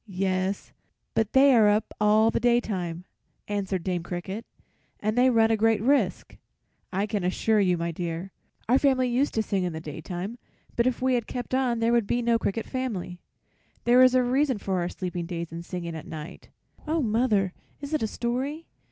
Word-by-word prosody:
"Yes, 190 0 -2 0.4
but 220 -2 0
they 275 +1 +6
are 220 -3 +6
up 210 +1 0
all 215 +2 +5
the - - 0
daytime," 190 -8 0 0.4
answered 195 -3 -2
Dame 180 -2 -1
Cricket, 190 +6 -6 0.5
"and 215 +1 -1
they 250 +1 +5
run 225 -2 +4
a - - +4
great 220 0 +3
risk, 270 +6 0 0.5
I 195 +2 0
can 210 -3 -2
assure 210 +4 +1
you, 180 -3 +2
my 170 0 -2
dear. 170 +2 -4 0.4
Our 255 +4 +4
family 260 -3 +2
used 260 +4 0
to 220 - +2
sing 195 -3 -1
in 175 -2 -2
the 160 - -5
daytime, 175 - -6 0.4
but 235 +1 +2
if 255 0 -1
we 260 0 +3
had 240 -3 0
kept 245 0 -5
on 250 -3 +1
there 230 +1 +3
would 235 -3 +2
be 240 +3 0
no 230 -1 +2
cricket 225 +1 -2
family. 215 -9 -4 0.6
There 245 +1 +5
is 255 0 +6
a 255 - +4
reason 260 +1 +1
for 190 -2 -2
our 175 0 -1
sleeping 180 -2 -4
days 170 -2 -5
and 165 +1 -6
singing 170 -2 -5
at 160 - -8
night." 155 0 -9 0.4
"Oh, 315 0 +1
mother, 215 -4 +1 0.3
is 285 +2 -7
it 310 - +1
a 220 - +1
story?" 260 +8 -3
215 Hz, 195 wpm, -26 LUFS, 180-245 Hz, 0.6 s, they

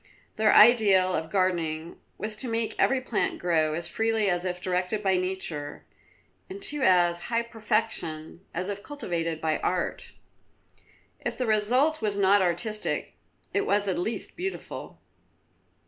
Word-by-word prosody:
Their 215 -1 +4
ideal 205 -5 +6
of 160 -2 -2
gardening 170 -4 -1 0.2
was 215 0 -3
to 250 - -6
make 225 -1 -1
every 270 - +3
plant 240 -4 -1
grow 160 -3 +1
as 170 +1 -3
freely 220 +1 +1
as 175 +1 -1
if 180 -1 -3
directed 185 +3 -1
by 190 -1 +3
nature, 180 -5 -3 0.6
and 385 +1 -7
to 295 -5 0
as 175 -4 +3
high 235 0 0
perfection 215 -8 -3
as 180 +2 -3
if 205 0 -4
cultivated 170 - -3
by 160 -1 0
art. 180 -1 -1 1.1
If - - -4
the 255 - -1
result 245 +8 +2
was 205 -2 -1
not 200 0 +4
artistic, 185 +5 -1 0.4
it 400 - 0
was 205 0 +2
at 185 -2 0
least 220 +6 -3
beautiful. 380 +3 -6
195 Hz, 145 wpm, -27 LUFS, 175-225 Hz, 1.1 s, ideal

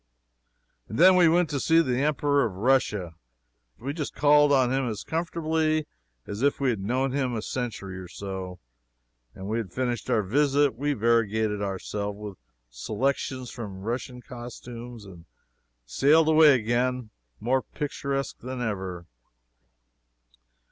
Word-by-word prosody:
And 110 - -5
then 185 +4 +7
we 175 -2 +6
went 175 +1 +3
to 140 - -1
see 165 +4 +4
the 130 -6 +1
Emperor 145 -1 +2
of 110 -6 -2
Russia. 105 -6 +1 0.6
We 135 +6 -4
just 150 -2 -5
called 145 0 +5
on 130 -2 +3
him 135 -2 0
as 110 -2 -5
comfortably 160 -1 0 0.4
as 100 +2 -6
if 140 +1 +2
we 135 -2 +2
had 110 - -3
known 125 +7 0
him 130 -3 -1
a 110 - -2
century 105 -8 -4
or 90 - -8
so, 95 -1 -6 0.8
and 95 - -9
when 100 - -4
we 110 - 0
had 100 -6 -5
finished 125 0 -2
our 110 - +2
visit 140 +6 +2
we 145 +4 -1
variegated 110 -3 +1
ourselves 100 +1 -3
with 105 -3 -8 0.3
selections 130 - -2
from 100 -6 -7
Russian 125 +3 -4
costumes 120 -1 -9
and 85 -4 -13 0.6
sailed 150 - +4
away 155 -3 +7
again 120 0 -1 0.3
more 130 +3 +1
picturesque 140 -2 -4
than 130 +1 -6
ever. 95 -7 -4
125 Hz, 145 wpm, -26 LUFS, 105-140 Hz, 0.8 s, then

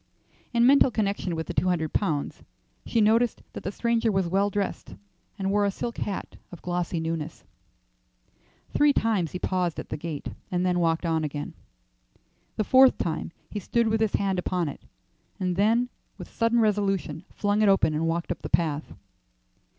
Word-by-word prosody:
In 235 -1 +3
mental 275 +1 +6
connection 200 -6 -1
with 160 0 -3
the - - -5
two 185 - +1
hundred 160 -4 0
pounds, 155 -8 -1 0.5
she 230 - +2
noticed 225 +2 +3
that - - -6
the 195 - -3
stranger 235 +1 +1
was 190 -3 +1
well 195 +3 +2
dressed, 200 - -3 0.4
and 195 -1 -1
wore 205 0 +3
a 200 - +3
silk 235 +4 -4
hat 200 - -4
of 175 - -11
glossy 175 -1 -2
newness. 160 -1 -4 1.3
Three 290 -1 +4
times 205 - 0
he - - -2
paused 180 -2 -1
at - - -7
the - - -3
gate, 155 -1 -5 0.2
and 180 0 0
then 180 -1 +2
walked 165 0 +1
on 160 -1 +1
again. 145 -1 -4 1.0
The 215 - 0
fourth 260 +4 +6
time 165 -1 -2 0.2
he 210 - -3
stood 230 +4 +1
with 220 0 +1
his 220 -2 +1
hand 195 -2 +1
upon 180 -3 -1
it, - - -9 0.6
and 180 -2 0
then 225 +5 +3 0.3
with - - -10
sudden 230 +1 +2
resolution 195 -7 0
flung 205 +1 +1
it 210 - +5
open 190 -5 +3
and 160 +2 0
walked 170 +1 -1
up 175 - -4
the - - -5
path. 155 -3 0
190 Hz, 180 wpm, -26 LUFS, 165-215 Hz, 1.3 s, mental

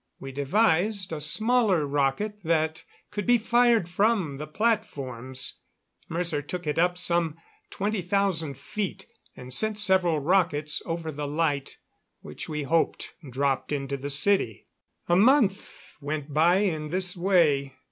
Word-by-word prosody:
We 135 - -7
devised 185 - +1
a 150 - -4
smaller 215 +1 +2
rocket 145 +10 -1
that 160 -1 0 0.3
could 205 -2 -4
be 245 0 +5
fired 235 -3 +3
from 185 -5 0
the 150 +2 -6
platforms. 135 - -2 0.5
Mercer 165 -3 -2
took 175 +4 -6
it 150 +1 -1
up 175 +1 +2
some 170 -3 +1 0.3
twenty 205 0 -2
thousand 175 -6 0
feet, 195 +8 -5 0.3
and 125 0 -8
sent 215 +7 +1
several 190 -5 +3
rockets 155 -2 +1
over 165 -1 -3
the 145 0 -5
light, 145 -2 -1 0.4
which 75 - -8
we 150 -1 -3
hoped 160 +4 0 0.2
dropped 135 +2 -1
into 140 -1 -2
the 140 +1 -5
city. 145 - +3 0.4
A 175 - +3
month 215 -1 +2
went 145 0 -4
by 165 +4 +4
in 170 -6 0
this 180 +2 -1
way. 165 -7 +2
165 Hz, 135 wpm, -26 LUFS, 145-195 Hz, 0.5 s, be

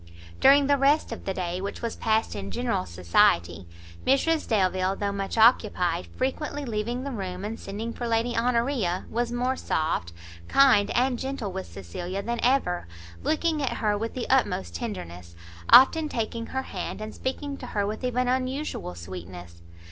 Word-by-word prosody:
During 280 +1 +6
the 285 0 +3
rest 285 +1 +3
of 230 - -7
the 195 - -1
day, 180 0 -3
which 200 +4 -5
was 230 - -2
passed 220 - 0
in 100 -1 -5
general 90 +1 -1
society, 85 0 +2 0.4
Mrs 300 +4 +2
Delvile, 190 -3 +1
though 200 0 -2
much 195 +2 -4
occupied, 205 -7 +3
frequently 285 +2 -3
leaving 235 +2 -2
the 280 - -4
room, 190 -4 -5
and 220 +2 -5
sending 220 +4 -5
for 240 - -4
Lady 230 +1 0
Honoria, 235 -5 0
was 240 +1 -1
more 250 +2 0
soft, 155 - -1 0.4
kind 260 -7 +5
and 250 -1 +2
gentle 265 -7 -4
with 190 0 -5
Cecilia 175 - -6
than 235 +2 -2
ever, 240 - +1 0.3
looking 315 -1 0
at 270 - 0
her 210 -2 0
with 225 +2 -4
the 255 - -3
utmost 205 -8 +1
tenderness, 90 - -6 0.3
often 305 +4 +7
taking 230 -1 -3
her 265 0 -3
hand, - - -5
and 215 0 -6
speaking 280 +2 -4
to 250 - -8
her 205 -3 -1
with 215 +4 -4
even 250 0 0
unusual 255 - -2
sweetness. 85 0 -9
225 Hz, 165 wpm, -26 LUFS, 180-255 Hz, 0.4 s, often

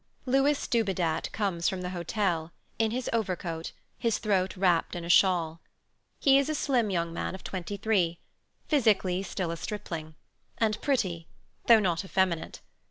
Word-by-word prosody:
Louis 275 +3 +2
Dubedat 185 -8 0
comes 190 -6 0
from 190 -2 -4
the 180 0 -4
hotel, 175 -2 -1 0.3
in 225 -1 +3
his 245 +3 -3
overcoat, 180 -7 -2 0.3
his 230 -2 +1
throat 195 -3 0
wrapped 180 -2 +2
in 170 -1 -5
a - - -6
shawl. 170 -3 +3 0.6
He 275 -1 +5
is 280 - 0
a 310 - 0
slim 250 -7 +1
young 170 -3 -1
man 180 - -3
of 190 - -11
23, 190 -2 -1 0.5
physically 205 - +2
still 185 -2 -3
a 170 - -4
stripling, 165 -6 -6 0.4
and 215 -2 0
pretty, 185 - 0 0.4
though 230 -2 +8
not 175 -3 0
effeminate. 185 -3 -1
190 Hz, 150 wpm, -28 LUFS, 170-220 Hz, 0.6 s, though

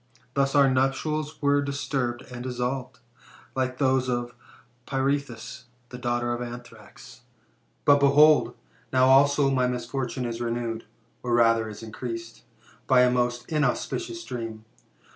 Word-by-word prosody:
Thus 140 0 +1
our 140 -1 +6
nuptials 150 +4 0
were 145 0 +3
disturbed 135 -3 -2
and 120 -1 -7
dissolved, 125 -1 -3 0.6
like 130 -1 -1
those 130 -2 +2
of 120 0 -2 0.5
Pirithous 135 -3 -2
and 120 0 -37
the 125 - -7
daughter 120 -1 0
of 120 - -4
Athrax.^ 120 0 -10 0.7
"But, 145 0 +6
behold! 145 +2 +5 0.4
now 130 0 +4
also 140 +1 +5
my 130 -2 +2
misfortune 125 +1 -3
is 120 0 -4
renewed, 115 -1 -3 0.4
or 120 -1 0
rather 115 -2 +3
is 105 +1 -9
increased, 115 0 -7 0.5
by 130 -1 +5
a 125 0 +4
most 120 -1 -1
inauspicious 250 - -1
dream. 115 -2 -6
125 Hz, 130 wpm, -26 LUFS, 120-140 Hz, 0.7 s, our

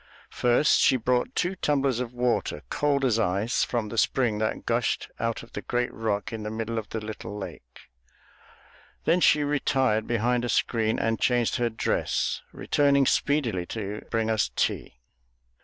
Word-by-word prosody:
First 125 +5 +3
she 130 - +4
brought 125 +1 0
two 180 +2 0
tumblers 140 -7 +1
of 125 -2 -3
water, 120 -10 -1
cold 140 -2 +1
as 115 -3 +2
ice, 100 +3 +1
from 115 -3 -2
the 115 - -1
spring 120 -6 +1
that 110 0 -2
gushed - - 0
out 115 0 -2
of 115 - -15
a - - -3
great 120 0 -1
rock 110 -2 -2
in 110 - -4
the 105 - -4
middle 115 +1 -3
of 105 - -9
the 110 - -3
little 105 -1 -7
lake. 85 -11 -9 1.2
Then 170 +2 +3
she 150 -3 +5
retired 135 -6 +1
behind 120 +1 +1
a 120 - -2
screen 110 -2 +1
and 115 -2 0
changed 120 -1 +2
her 120 -1 +1
dress, 110 - -1
returning 140 -1 +2
speedily 120 -13 +1
to 105 -1 -5
bring 115 -1 0
us 110 -2 +1
tea. - - -1
115 Hz, 165 wpm, -26 LUFS, 110-130 Hz, 1.2 s, she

